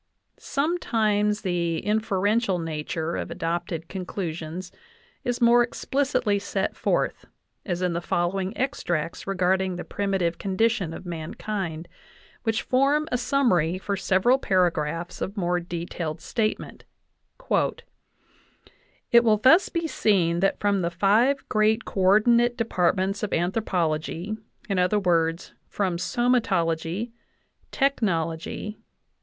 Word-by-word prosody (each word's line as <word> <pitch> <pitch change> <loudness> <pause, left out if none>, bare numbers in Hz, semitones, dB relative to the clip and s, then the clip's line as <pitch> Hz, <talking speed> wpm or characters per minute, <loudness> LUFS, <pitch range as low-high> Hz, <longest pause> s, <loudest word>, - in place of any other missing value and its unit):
Sometimes 220 -9 0
the 175 -4 -1
inferential 210 -1 +1
nature 160 0 -3
of - - -4
adopted 170 -1 -3
conclusions 175 -2 -5 0.5
is 245 -1 -1
more 240 0 +6
explicitly 250 -3 0
set 195 -1 -2
forth, - - -1 0.4
as 180 -1 -2
in 180 -1 +1
the 170 - -2
following 185 +3 -1
extracts 175 - -2
regard 190 -1 +2
ing 190 -1 -2
the 175 - -5
.primitive 190 -4 -1
condition 195 -2 0
of 165 - -8
mankind, 170 0 -4 0.5
which 225 -1 -1
form 280 +4 +2
a 250 - +2
sum 275 +1 +2
mary 170 -1 +2
for 200 +1 -2
several 195 +7 +3
paragraphs 170 - 0
of 200 +3 -4
more 180 -2 +1
detailed 170 -2 -5
statement: 215 +6 -3 0.7
"It 235 0 -2
will 220 -2 +4
thus 320 - +5
be 335 -1 -2
seen 180 - +2
that 195 +2 +1
from 200 -2 +1
the 170 - 0
five 215 +10 +2
great 215 +1 +2
co - - -5
ordinate 235 +5 +4
depart 200 -7 +1
ments 195 +1 -1
of 210 - -2
anthropology, 175 0 -1 0.3
i. 200 - -1
e., 180 -3 +2 0.3
from 185 -4 -1
somatology,... 190 -2 0 0.6
tech 275 0 +1
nology 170 +2 -2
190 Hz, 120 wpm, -25 LUFS, 170-225 Hz, 0.7 s, more